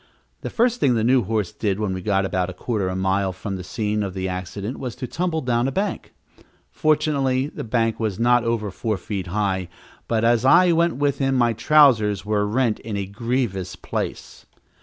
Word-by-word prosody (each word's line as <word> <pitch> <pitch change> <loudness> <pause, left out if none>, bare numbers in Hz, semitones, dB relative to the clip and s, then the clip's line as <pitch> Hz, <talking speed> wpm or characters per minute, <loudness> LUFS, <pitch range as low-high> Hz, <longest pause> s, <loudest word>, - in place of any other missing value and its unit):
The - - -4
first 245 +1 +1
thing 125 -3 +3
the 110 - +1
new 125 +2 +4
horse 105 -3 -1
did 100 -2 -2
when 100 -3 -1
he 95 - -5
got 95 0 +1
about 95 -1 -1
a - - -6
quarter 105 -2 -2
of 95 - -2
a - - -4
mile 95 +1 0
from 95 +2 -5
the 90 - -6
scene 105 +3 -2
of 100 -2 -4
the 95 0 -2
accident 95 +5 -5
was 125 -4 -5
to 125 - -5
tumble 165 +3 -2
down 120 -1 +1
a - - -1
bank. 195 +6 -3 0.6
Fortunately 140 -4 +1
the - - -7
bank 115 -1 0
was 110 -4 -2
not 120 +1 +3
over 115 -3 -1
four 105 +4 -2
feet 95 0 -5
high, 95 -2 -1 0.4
but 115 -1 0
as 120 0 +3
I 175 +6 +6
went 170 +1 +2
with 140 0 0
him, 135 -1 +1
my 120 -2 +3
trousers 110 -7 +4
were 105 -1 +1
rent 115 0 +1
in 110 -2 -5
a 100 - -2
grievous 100 -3 -2
place. - - -5
110 Hz, 205 wpm, -22 LUFS, 95-130 Hz, 0.6 s, I